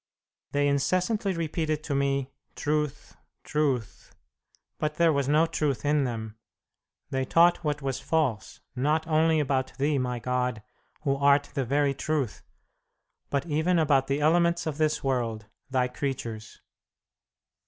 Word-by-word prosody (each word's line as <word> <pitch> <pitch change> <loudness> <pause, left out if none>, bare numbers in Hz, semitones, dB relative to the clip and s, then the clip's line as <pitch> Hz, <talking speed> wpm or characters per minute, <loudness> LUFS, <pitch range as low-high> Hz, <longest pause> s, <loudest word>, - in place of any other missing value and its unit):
"They 145 0 +2
incessantly 185 +8 +1
repeated 155 -2 -2
to 145 - -3
me, 140 -1 0 0.2
'Truth, 150 -1 -2 0.3
truth,' 140 -7 -2 0.6
but 150 0 -1
there 170 -2 +4
was 140 -2 0
no 155 +3 +4
truth 145 -7 -1
in 145 -1 +2
them. 110 -3 -5 0.7
They 130 0 0
taught 170 +5 +4
what 150 -2 -2
was 135 -1 -2
false, 145 -10 -1
not 150 +5 +1
only 160 0 +3
about 135 -2 -1
Thee, 145 +1 +1
my 125 -1 -1
God, 125 -2 -2 0.4
Who 140 -2 +1
art 140 0 +3
the 135 - -1
very 140 +2 +2
Truth, 140 -3 -2 0.9
but 140 -1 -1
even 165 +3 +1
about 140 -4 +3
the 140 +2 0
elements 170 +2 +3
of 155 -2 -3
this 155 -1 +1
world, 120 -5 -1 0.2
Thy 130 -1 +1
creatures." 120 -4 -5
140 Hz, 135 wpm, -27 LUFS, 130-155 Hz, 0.9 s, there